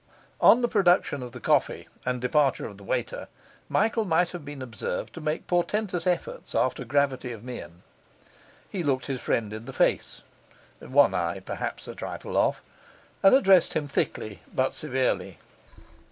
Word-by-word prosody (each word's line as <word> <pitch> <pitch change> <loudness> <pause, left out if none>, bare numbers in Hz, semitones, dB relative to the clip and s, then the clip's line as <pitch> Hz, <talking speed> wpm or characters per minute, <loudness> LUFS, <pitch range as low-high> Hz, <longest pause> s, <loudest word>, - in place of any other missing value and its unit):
On 245 - +6
the - - +4
production 180 - +3
of 125 -2 -8
coffee - - +1 0.2
and 125 0 0
departure 135 +2 +2
of 100 - -8
the 100 - -13
waiter, - - -3 0.4
Michael 225 +1 +2
might 175 -2 +2
have 175 -4 -7
been 145 -2 -7
observed 110 -7 -4
to 165 - -8
make 155 +1 -2
portentous 180 0 0
efforts 175 -1 -2
after 130 0 +1
gravity 135 -1 0
of 115 -2 -8
mien. 90 -9 -8 0.8
He 190 - -4
looked 135 -5 0
his 130 -1 -3
friend 110 -2 -1
in 110 +1 -7
the - - -8
face - - +1 0.6
(one 135 -6 +4
eye 85 0 -1
perhaps 95 - -5
a - - -6
trifle - - -6
off), - - +2 0.6
and 195 +6 +7
addressed 195 -9 +5
him 150 -2 -1
thickly 110 -6 -2
but 130 0 0
severely. 130 -3 -1
140 Hz, 155 wpm, -27 LUFS, 120-175 Hz, 0.8 s, and